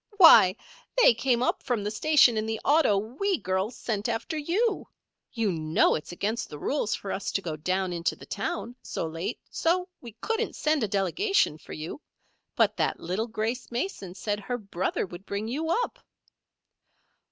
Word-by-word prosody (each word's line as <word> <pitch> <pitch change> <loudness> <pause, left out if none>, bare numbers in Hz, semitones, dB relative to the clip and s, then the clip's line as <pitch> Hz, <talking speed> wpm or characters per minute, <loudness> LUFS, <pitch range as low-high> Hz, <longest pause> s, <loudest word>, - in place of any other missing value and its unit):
"Why, 220 - +9 0.4
they - - +7
came 240 +1 +1
up - - 0
from 245 -6 -1
the 210 - -2
station 270 +1 +5
in 215 0 -1
the 220 0 -2
auto 290 -8 +4
we 275 - -1
girls 190 +3 -2
sent 215 -1 -2
after 230 +9 -2
you. 380 +9 0 0.4
You 225 -4 0
know 155 -1 +2
it's 150 - -4
against 210 +6 -2
the 150 - -8
rules 240 - -1
for 195 - -6
us 195 0 -3
to - - +2
go 160 -3 -3
down 185 +4 -1
into 170 0 -1
the - - -13
town 240 - -4
so - - -4
late, 165 +8 -4
so 360 +2 +1
we 235 -3 -10
couldn't 450 - -2
send 305 -1 +1
a 220 - +1
delegation 200 - +1
for - - -11
you; 160 - -6 0.5
but - - +3
that - - 0
little 185 +7 -2
Grace 230 +2 -3
Mason 235 - -4
said 205 0 -2
her 245 +4 -3
brother 195 -4 -2
would 175 0 -10
bring 200 +2 -3
you 305 +7 -2
up." 485 +7 0
220 Hz, 175 wpm, -27 LUFS, 190-295 Hz, 0.5 s, Why